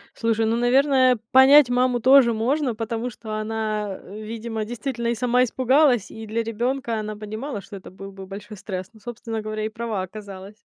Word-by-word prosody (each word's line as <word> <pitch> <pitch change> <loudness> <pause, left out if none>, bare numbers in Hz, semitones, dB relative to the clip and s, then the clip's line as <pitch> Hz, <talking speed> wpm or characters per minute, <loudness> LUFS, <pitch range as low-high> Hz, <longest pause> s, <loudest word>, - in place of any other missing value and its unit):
Слушай, 225 -1 0
ну, 225 +1 +1
наверное, 255 +1 +3
понять 265 +1 +7
маму 250 0 +2
тоже 260 -1 +6
можно, 250 +2 0
потому 230 +2 -3
что 215 -1 -9
она, 215 -2 -3
э, 210 +3 -10
видимо 225 0 -5
действительно 235 +1 -4
и 235 - +1
сама 250 +1 +2
испугалась, 255 -2 +2
и 220 -1 -9
для 230 +2 -1
ребёнка 235 +1 -2
она 215 0 -5
понимала, 215 +3 -6
что 200 - -11
это 190 - -12
был 195 +1 -10
бы 190 -1 -10
большой 205 +1 -9
стресс. 185 0 -6
Ну, 220 - -18
собственно 225 0 -6
говоря, 215 0 -4
и - - -2
права 220 -4 -4
оказалась. 200 0 -10
225 Hz, 185 wpm, -23 LUFS, 215-245 Hz, -, понять